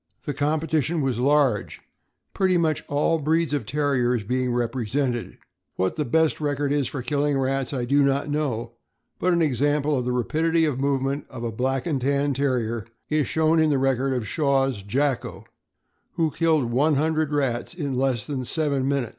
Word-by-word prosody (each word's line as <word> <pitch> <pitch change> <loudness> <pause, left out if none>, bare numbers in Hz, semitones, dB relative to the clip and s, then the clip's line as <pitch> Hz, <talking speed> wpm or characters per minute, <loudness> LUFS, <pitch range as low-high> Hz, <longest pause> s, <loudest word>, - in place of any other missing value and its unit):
The 145 - -2
competition 155 +2 0
was 130 -3 -1
large, 135 -5 +2 0.5
pretty 185 -2 +2
much 160 -3 0
all 150 +3 +1
breeds 160 +1 +1
of 135 -8 -2
Terriers 125 -4 +1
being 125 +4 -1
repre 120 -1 -1
sented. 125 -3 -1 0.4
What 95 0 0
the 150 - -1
best 160 +5 +1
record 145 -1 -1
is 145 -4 +1
for 130 -1 -5
killing 145 +1 0
rats 135 -1 -1
I 125 -4 -2
do 140 +3 +3
not 140 +1 +1
know, 135 -6 -2 0.5
but 180 - +2
an 170 -1 +3
example 145 +1 +1
of 125 -2 -1
the 125 - 0
rapidity 160 +7 +1
of 140 -4 -1
movement 140 0 -1
of 125 -3 -8
a 115 - -2
Black 130 +3 -1
and 145 -6 -1
Tan 140 +2 +1
Terrier 120 -5 -1 0.2
is 150 -4 +1
shown 160 +1 +2
in 160 -1 +3
the 145 - +2
record 135 0 +1
of 120 -4 -2
Shaw's 135 -4 +1
Jacko, 130 +6 -1 0.7
who 165 -3 0
killed 155 -6 +1
one 145 +5 +3
hundred 155 +1 0
rats 135 0 -1
in 145 -6 -3
less 130 -4 0
than 135 -3 -3
seven 140 -1 0
minutes. 135 -5 0
140 Hz, 180 wpm, -24 LUFS, 125-150 Hz, 0.7 s, do